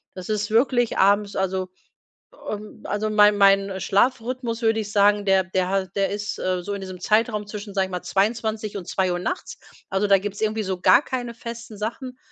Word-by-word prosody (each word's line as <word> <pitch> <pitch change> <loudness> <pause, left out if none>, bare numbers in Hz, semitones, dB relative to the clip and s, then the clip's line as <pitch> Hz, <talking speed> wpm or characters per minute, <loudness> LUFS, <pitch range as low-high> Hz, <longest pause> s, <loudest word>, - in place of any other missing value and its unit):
Das 185 -1 -8
ist 210 -1 -1
wirklich 245 +1 +2
abends 200 +1 +3
also 190 -1 -1 1.2
also, 210 +1 -2
ähm, 215 - -3
mein 210 0 +6
mein 195 -1 +4
Schlafrhythmus, 235 +3 0
würde 225 0 +2
ich 210 -1 -6
sagen, 205 0 +3
der 190 -1 +4
der 185 -1 -1
hat 190 -1 -1
der 195 -1 +2
ist, 210 +1 -4
äh, 185 -1 -1
so 205 - -5
in 200 - -4
diesem 185 -1 -7
Zeitraum 215 +2 +1
zwischen, 205 -1 -8
sage 195 -1 +2
ich 190 - -12
mal, 180 - -3
22:00 215 0 -1
und 175 - -10
2:00 185 -2 0
nachts, 360 - -4 0.3
also 195 +2 +1
da 200 -1 +6
gibt's 200 +1 -6
irgendwie 220 0 0
so 190 -2 -3
gar 245 - +6
keine 245 -4 -4
festen 230 -1 -8
Sachen, 250 +4 -5
205 Hz, 195 wpm, -23 LUFS, 190-225 Hz, 1.2 s, mein